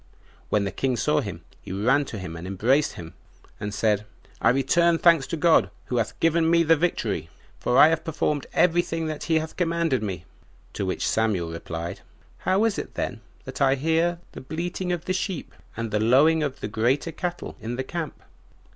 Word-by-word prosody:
When 105 - +2
the 100 - -2
king 130 +5 -1
saw 150 +3 +2
him, 95 -8 -6 0.2
he - - -9
ran 125 +9 +2
to 110 - -7
him, 95 -4 -6
and 85 +2 -7
embraced 120 +10 +2
him, 80 -1 -9 0.5
and 105 - -4
said, 105 -1 +1 0.4
"I - - +5
return 165 +7 +3
thanks 165 -5 +4
to 165 - -3
God, 150 - +4 0.2
who 125 - -2
hath 115 -2 -2
given 165 0 +3
me 170 0 +4
the 165 0 +5
victory, 120 - -1 0.3
for 125 - +1
I 155 - +9
have 165 0 0
performed 150 -3 -1
every 175 0 +4
thing 165 -1 -3
that 155 -1 -4
he 160 -1 +2
hath 160 0 -3
commanded 165 -7 +1
me." 95 -5 -4 0.5
To 100 - -3
which 95 - -1
Samuel 100 -7 0
replied, 85 0 -5 0.4
"How 190 +3 +2
is 225 -3 +1
it - - -7
then 115 -3 -3 0.2
that 130 +2 -8
I 135 0 +4
hear 165 +4 +1
the - - -9
bleating 175 +5 -3
of 175 -2 -3
the 185 - 0
sheep 185 -2 -3 0.2
and 115 -1 -3
the 105 - +1
lowing 140 +9 +4
of 140 -2 -3
the - - -2
greater 120 +9 0
cattle 175 +2 -5
in 115 +2 -4
the 130 - -2
camp?" 165 +2 -5
140 Hz, 200 wpm, -25 LUFS, 110-165 Hz, 0.5 s, I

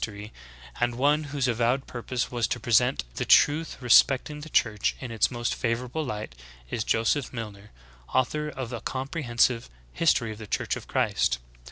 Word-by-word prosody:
M - - -1
tory, 105 +2 -9 0.5
and 120 0 +1
one 145 +4 +2
whose 145 -2 -1
avowed 120 +3 +1
purpose 120 +1 -4
was 120 -2 0
to 120 - -2
present 120 - +2
the - - 0
truth 155 +3 +4
respecting 135 +4 +4
the 160 - -9
Church 105 -7 +1
in 130 -3 -6
its 115 - +2
most 120 -1 -2
favorable 125 +6 -2
Hght, 105 - -5 0.4
is 110 - -1
Joseph 115 +5 +1
Alilner, 105 -3 -7 0.4
author 150 +4 0
of 130 -4 -6
a 120 - -5
comprehensive 130 - 0 0.2
"History 130 -9 +2
of 110 - -9
the 110 - -8
Church - - -1
of - - -9
Christ." 60 0 +1
120 Hz, 170 wpm, -26 LUFS, 115-135 Hz, 0.5 s, truth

